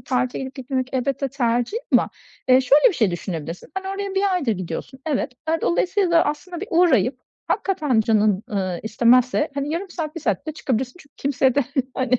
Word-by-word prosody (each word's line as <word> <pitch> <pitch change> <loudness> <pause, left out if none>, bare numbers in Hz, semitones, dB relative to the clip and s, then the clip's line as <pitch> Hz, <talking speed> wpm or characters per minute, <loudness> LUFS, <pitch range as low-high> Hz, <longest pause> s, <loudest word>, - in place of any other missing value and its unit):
partiye 255 +1 -1
gidip 265 - -8
gitmemek 260 -1 -3
elbette 270 +1 -1
tercih 245 - 0
ama, - - +4 0.4
eee, 255 +1 +7
şöyle 280 - +5
bir 430 - -1
şey 215 - +2
düşünebilirsin: 170 -1 -5
Sen 385 - -3
oraya 395 -1 -4
1 390 0 +2
aydır 275 -11 +1
gidiyorsun, 190 +8 -6
evet 275 -4 -1 0.2
ve 325 0 +1
dolayısıyla 355 -1 +2
aslında 325 +4 -4
bir 410 - -6
uğrayıp 270 - +3 0.3
hakikaten 305 - +1
canın, 215 -2 +2
eee, 185 -4 -2
istemezse, 245 +6 +3
hani, 280 +1 -2
yarım 365 +3 -3
saat, 315 -3 -4
1 330 - -6
saatte 245 - -1
çıkabilirsin, 255 -3 -2
çünkü 280 -4 -19
kimseye 270 -2 +1
de, 285 -3 +2 0.3
hani, 255 -1 +1
265 Hz, 175 wpm, -22 LUFS, 235-325 Hz, 0.4 s, eee